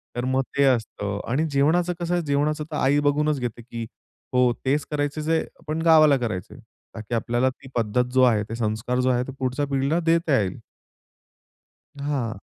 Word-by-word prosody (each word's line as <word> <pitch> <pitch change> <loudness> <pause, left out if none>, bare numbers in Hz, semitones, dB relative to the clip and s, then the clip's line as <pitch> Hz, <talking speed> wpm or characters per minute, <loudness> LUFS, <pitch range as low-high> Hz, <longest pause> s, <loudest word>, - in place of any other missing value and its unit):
तर 120 0 -2
मग 130 +1 +1 0.2
ते 140 - +4
असतं 110 -5 0
आणि 150 +6 +1
जेवणाचं 165 +6 +2
कसं 175 0 -2
आहे? 175 - +1
जेवणाचं 150 +1 0
तर - - -3
आई 140 +2 +3
बघूनच 145 0 +1
घेते, 120 -1 -4
की 115 0 -7 0.5
हो. 125 -1 +4
तेच 145 +3 +1
करायचं 145 0 -1
जे 160 +1 0 0.2
पण 155 +1 -2
गावाला 155 -3 +6
करायचं. 110 -8 -4 0.4
का 110 - -5
की 115 +2 -4
आपल्याला 120 +3 +1
ती 130 +1 -13
पद्धत 115 +1 +1
जो 130 0 +5
आहे, 110 -4 +4
ते 115 +2 -6
संस्कार 115 +2 -1
जो 130 - +2
आहे, 125 -1 +2
ते - - -5
पुढच्या 130 +2 -1
पिढीला 140 +4 0
देता 165 -3 +2
येईल. 95 -3 -2 1.4
हां. 130 -7 -2
135 Hz, 180 wpm, -24 LUFS, 120-150 Hz, 1.4 s, गावाला